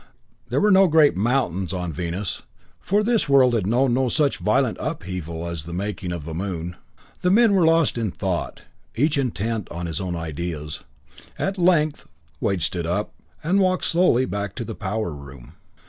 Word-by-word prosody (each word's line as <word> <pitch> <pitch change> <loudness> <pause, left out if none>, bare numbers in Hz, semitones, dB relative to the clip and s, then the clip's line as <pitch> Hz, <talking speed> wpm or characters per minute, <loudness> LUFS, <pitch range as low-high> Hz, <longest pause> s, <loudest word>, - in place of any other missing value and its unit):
There - - +1
were 210 0 +4
no 190 0 +6
great 155 -3 +5
mountains 95 -5 0
on 90 -3 -3
Venus, 90 +5 -3 0.4
for 205 +2 +1
this 225 -7 +1
world 130 -3 +5
had 105 -5 0
known 120 +3 +2
no 130 0 +2
such 145 +1 +1
violent - - +1
upheaval 85 -2 -4
as 85 -3 -4
the 85 - -7
making 95 -1 -3
of 85 -3 -5
a 80 - -5
moon. 85 -1 -4 0.5
The 180 - +2
men 220 +2 +5
were 180 -4 +4
lost 165 -6 +3
in 110 -3 0
thought, 95 -2 -3 0.3
each 145 +6 +2
intent 115 -5 -2
on 85 +1 -5
his 80 0 -3
own 90 -2 -3
ideas. 80 -1 -5 0.5
At 195 0 -2
length 165 -4 +2 0.3
Wade 95 -4 0
stood 85 -2 -1
up, 100 +5 -2 0.3
and 180 +6 +2
walked 185 -1 +2
slowly 165 -8 +3
back 100 -3 -4
to 120 - -4
the 115 - -5
power 105 -2 -3
room. 70 -4 -11
105 Hz, 180 wpm, -23 LUFS, -, 0.5 s, no